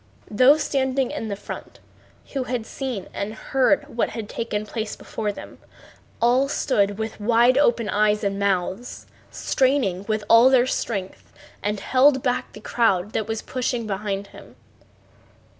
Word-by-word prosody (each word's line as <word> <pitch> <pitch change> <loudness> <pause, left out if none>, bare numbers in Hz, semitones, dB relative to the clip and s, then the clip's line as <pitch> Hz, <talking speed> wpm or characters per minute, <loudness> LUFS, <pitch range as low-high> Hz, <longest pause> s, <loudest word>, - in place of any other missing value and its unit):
Those 260 +8 +5
standing 265 -1 0
in 215 -3 -4
front, 200 - -9 0.5
who 270 -3 -2
had 245 -3 -3
seen 250 -8 -5
and 210 +2 -4
heard 270 +5 +1
what 235 - +1
had 225 -3 -6
taken 215 -2 -3
place 220 0 -4
before 215 -2 -4
them, - - -11 0.6
all 250 +4 +3
stood 205 -9 +1
with 220 -1 -5
wide 235 +3 +4
open 240 -5 +2
eyes 210 +1 +2
and 200 0 -1
mouths, 200 +3 -2 0.2
straining 255 -9 0
with 215 -1 -1
all 230 +3 +7
their 255 -2 +4
strength, 200 -7 -4 0.3
and 205 0 -2
held 265 +2 +3
back 250 -2 -1
the - - -10
crowd 210 -4 +1
that 220 - -2
was 220 -1 -3
pushing 245 -2 -2
behind 200 -1 -3
them. - - -14
225 Hz, 145 wpm, -23 LUFS, 205-255 Hz, 0.6 s, all